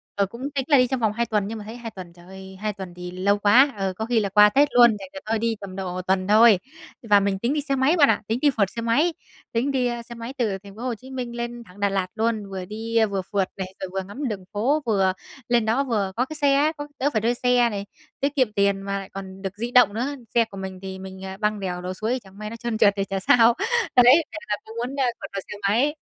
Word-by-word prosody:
Ờ, 200 - +2
cũng 235 +6 -11
tính 270 -2 -1
là 285 -3 +5
đi 250 - +4
trong 260 0 -2
vòng 220 -2 +1
2 235 +1 0
tuần 210 -3 0
nhưng 225 +1 -5
mà 210 - -8
thấy 220 +2 -8
2 235 -2 -7
tuần, 180 -4 -10
trời 175 0 -17
ơi, 190 0 -11
2 215 0 -1
tuần 190 -3 -8
thì 180 0 -8
lâu 195 +3 +1
quá, 255 +8 +5
ờ, 195 -1 -1
có 220 +4 -4
khi 235 -1 +2
là 200 -2 -1
qua 210 +1 +7
Tết 285 +6 +4
luôn, 240 -1 +8
thành 190 -1 -9
ra 190 - -6
thôi 220 0 0
đi 230 0 0
tầm 190 -2 -8
độ 185 -1 -4
tuần 185 +1 0
thôi. 215 -2 +6 0.4
Và 210 -2 +5
mình 195 -1 -1
tính 240 +7 0
đi 300 - 0
xe 275 -1 -1
máy 270 +6 +3
bạn 285 -3 +6
ạ, - - +2
tính 225 +2 -1
đi 295 - +5
phượt 200 -3 +2
xe 230 - -6
máy, 290 +9 +2 0.4
tính 240 +5 0
đi, 255 -2 +1
ơ, 240 -1 -3
xe 235 0 -11
máy 230 +2 -7
từ 215 -6 0
thành 200 0 -14
phố 225 - -10
Hồ 250 -2 -2
Chí 260 +4 -14
Minh 245 -2 -5
lên 240 0 -5
thẳng 185 0 -17
Đà 200 0 +2
Lạt 195 -2 -1
luôn. 220 -3 -1
Vừa 190 -1 -5
đi 225 +3 0
vừa 200 -2 -2
phượt 195 0 -1
này, 190 -1 -5
rồi 190 - -4
vừa 190 - -1
ngắm 260 +7 -4
đường 195 -4 -5
phố 270 +9 +1
vừa 195 -4 +2 0.4
lên 240 -2 +3
đó 230 +5 +2
vừa 210 -7 -1
có 250 - +1
cái 310 - -8
xe 285 -2 +3
á, 295 +3 +3
có 290 - -6
đỡ 280 +3 +2
phải 215 - +1
thuê 235 +3 +2
xe 245 -1 +3
này, 200 -2 -4 0.3
tiết 280 +1 -1
kiệm 255 -7 +2
tiền 200 -1 +1
mà 200 0 -3
lại 195 0 -9
còn 195 -1 -8
được 195 +1 -5
di 235 +3 -3
động 245 -5 +6
nữa. 255 +6 -2 0.2
Xe 230 -1 +5
của 195 - -12
mình 190 -1 -6
thì 190 -1 -7
mình, 190 0 -9
à, 190 0 -7
băng 210 -1 0
đèo 180 -2 -4
lội 180 +1 -4
suối 225 +6 -2
chẳng 195 +1 -17
may 210 0 -6
nó 230 - -7
trơn 230 -1 -3
trượt 210 -3 +5
thì 195 - +1
chả 195 0 -3
sao. 230 +4 +5 0.4
Đấy 255 +6 +7
thế - - -7
là 210 - +2 0.2
muốn, 250 +4 -3
a, 265 - +3
phượt - - -7
bằng 195 - -3
xe 210 - -7
máy. 245 +10 +2
215 Hz, 290 wpm, -24 LUFS, 195-245 Hz, 0.4 s, luôn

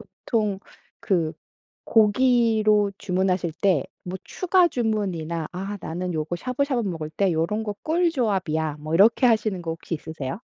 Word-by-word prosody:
보통 210 -5 -2 0.4
그 170 -5 0 0.5
고기로 220 -2 +3
주문하실 185 -2 0
때 185 -8 +3 0.2
뭐 185 +1 -5
추가 370 -1 +2
주문이나 185 - -2
'아 195 +3 -5
나는 180 +2 -4
요거 155 +2 -2
샤브샤브 255 - -1
먹을 160 -3 -4
때 195 +3 +1
요런 170 +7 0
거 210 - -3
꿀 340 +2 +2
조합이야.' 180 - -1
뭐 155 +2 -3
이렇게 225 +8 +5
하시는 215 -5 +1
거 165 - -4
혹시 165 +1 -5
있으세요? 155 -4 -6
195 Hz, 300 characters per minute, -24 LUFS, 165-225 Hz, 0.5 s, 이렇게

